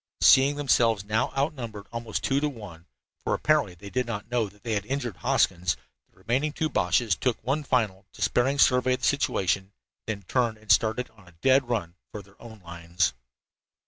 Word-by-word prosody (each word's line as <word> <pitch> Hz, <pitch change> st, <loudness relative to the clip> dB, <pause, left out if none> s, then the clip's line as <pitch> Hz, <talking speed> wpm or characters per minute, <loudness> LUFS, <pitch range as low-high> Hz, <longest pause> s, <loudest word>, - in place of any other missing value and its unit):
Seeing 135 Hz, +2 st, +6 dB
themselves 115 Hz, -7 st, +2 dB
now 110 Hz, +3 st, 0 dB
outnumbered 120 Hz, -8 st, -3 dB
almost 115 Hz, -1 st, -4 dB
two 135 Hz, +1 st, +1 dB
to 150 Hz, +1 st, 0 dB
one 95 Hz, -, -11 dB, 0.4 s
for -, -, 0 dB
apparently 150 Hz, -12 st, +1 dB
they 100 Hz, +3 st, -11 dB
did 125 Hz, -1 st, -1 dB
not 110 Hz, 0 st, -5 dB
know 115 Hz, -4 st, 0 dB
that 100 Hz, +1 st, -24 dB
they 115 Hz, -, -2 dB
had 100 Hz, -2 st, -1 dB
injured 130 Hz, -6 st, -3 dB
Hoskins 90 Hz, -3 st, +1 dB, 0.3 s
the -, -, -40 dB
two -, -, -33 dB
remaining 125 Hz, +10 st, -1 dB, 0.2 s
Boches 90 Hz, +4 st, +2 dB
took 125 Hz, -3 st, -1 dB
one 140 Hz, +6 st, -1 dB
final, 105 Hz, -8 st, -1 dB
despairing 135 Hz, +3 st, 0 dB
survey 125 Hz, -1 st, +4 dB
of -, -, -12 dB
the -, -, 0 dB
situation, 100 Hz, -7 st, 0 dB, 0.3 s
then 105 Hz, -2 st, -4 dB
turned 115 Hz, +2 st, 0 dB
and 110 Hz, -1 st, -3 dB
started 110 Hz, +5 st, +2 dB
on 105 Hz, -4 st, -21 dB
a 85 Hz, -, -17 dB
dead 130 Hz, -1 st, +4 dB
run 85 Hz, -8 st, -2 dB, 0.2 s
for 105 Hz, -, -7 dB
their 95 Hz, +1 st, -23 dB
own 110 Hz, -3 st, -12 dB
lines. 85 Hz, -2 st, -2 dB
110 Hz, 185 wpm, -26 LUFS, 100-130 Hz, 0.4 s, Seeing